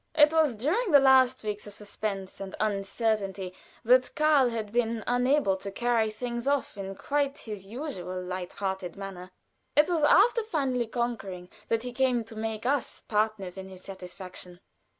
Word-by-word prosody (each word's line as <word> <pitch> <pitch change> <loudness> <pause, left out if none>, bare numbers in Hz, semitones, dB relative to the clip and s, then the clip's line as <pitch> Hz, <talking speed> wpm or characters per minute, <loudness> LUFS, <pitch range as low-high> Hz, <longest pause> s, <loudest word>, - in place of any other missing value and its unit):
It 300 0 +6
was 310 -6 +3
during 345 - 0
the 290 -4 +8
last 260 -2 +5
weeks 210 -1 -4
of 205 - -8
suspense 200 -2 -5
and 195 -1 -6
uncertainty 200 -2 -1 0.3
that 250 +2 +4
Karl 305 -4 +4
had 220 -3 -4
been 230 -1 0
unable 245 -3 +2
to 200 - -6
carry 235 0 +1
things 235 +3 -4
off 280 -4 0
in 195 -1 -6
quite 285 +4 -1
his 205 -4 -8
usual 195 - -5
light 180 0 -5
hearted 190 -3 -3
manner; 195 -2 -7 0.5
it 295 +2 +6
was 340 -3 +1
after 415 +10 +5
finally 270 - -1
conquering 220 -7 -3 0.2
that 225 0 0
he 250 -1 -5
came 250 -2 +2
to 225 0 -12
make 220 0 -4
us 275 -1 0
partners 210 -4 -1
in 190 0 -8
his 185 -1 -12
satisfaction. 180 -1 -8
225 Hz, 165 wpm, -28 LUFS, 195-260 Hz, 0.5 s, the